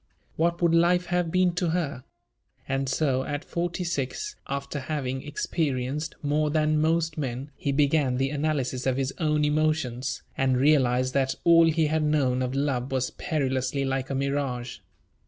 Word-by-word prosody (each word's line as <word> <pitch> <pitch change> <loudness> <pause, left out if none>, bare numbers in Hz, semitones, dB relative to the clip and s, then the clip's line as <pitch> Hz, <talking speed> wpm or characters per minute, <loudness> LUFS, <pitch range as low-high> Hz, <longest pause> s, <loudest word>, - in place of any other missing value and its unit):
What 170 +2 0
would 170 -1 +4
life 175 +2 +4
have 175 -1 0
been 185 +1 +2
to 175 -1 0
her? 150 -7 -2 0.6
And 135 0 -1
so, 130 -2 +1
at 145 +2 -4
forty 175 +1 -2
six, 170 - -3
after 140 +1 -3
having 135 -2 -3
experienced 145 -1 -2
more 150 +1 +1
than 155 0 +2
most 160 0 +1
men, 135 +1 -4
he 140 - -2
began 140 -2 +2
the 135 +1 0
analysis 140 -4 -1
of 130 -1 +1
his 135 0 -1
own 150 -2 +2
emotions, 150 -5 0
and 130 -1 +2
realized 130 -2 +3
that 135 -1 +1
all 165 -1 +6
he 160 0 +2
had 155 +1 +1
known 140 -4 +1
of 130 +1 -2
love 135 -2 -1
was 130 -1 0
perilously 135 -2 -1
like 135 -1 -2
a 135 - -2
mirage. 135 -3 -2
145 Hz, 160 wpm, -26 LUFS, 130-160 Hz, 0.6 s, all